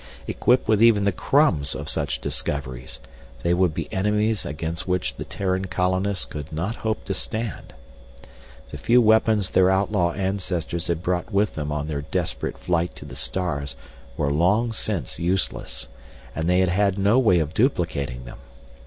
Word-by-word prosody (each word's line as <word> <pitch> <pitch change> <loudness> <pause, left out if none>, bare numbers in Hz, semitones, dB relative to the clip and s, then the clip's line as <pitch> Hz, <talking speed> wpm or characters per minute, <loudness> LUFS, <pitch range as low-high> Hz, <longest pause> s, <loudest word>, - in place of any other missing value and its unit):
Equipped 125 -1 +2
with 110 -1 +3
even 115 -3 +6
the 100 - +3
crumbs 90 - +2
of - - -6
such - - -2
discoveries, 65 -4 -3 0.4
they 85 - +2
would 90 -1 +3
be - - -4
enemies 105 +2 +1
against 80 +4 -4
which 90 0 0
the - - -6
Terran 95 -1 -1
colonists 95 +2 0
could 75 -1 -7
not 85 +9 -3
hope 110 -1 -2
to 100 - -2
stand. 110 +3 -4 1.0
The - - -7
few 120 +1 +4
weapons 110 -3 +3
their 95 0 +5
outlaw 95 -3 +2
ancestors 90 -3 -2
had 85 0 -1
brought 90 +3 -1
with 100 +1 +2
them 75 -1 -4
on 75 0 -2
their 75 -2 -3
desperate 70 - -3
flight 85 0 -1
to - - -10
the - - -9
stars 70 -7 -2 0.4
were 70 -2 +1
long 105 +9 +2
since 95 - -3
useless, 90 +2 -1 0.5
and 80 +2 -1
they 90 +1 +4
had 95 - +2
had 100 +1 +2
no 100 +5 +4
way 110 -9 +4
of 80 -1 -1
duplicating 80 - 0
them. - - -10
90 Hz, 165 wpm, -24 LUFS, 80-105 Hz, 1.0 s, even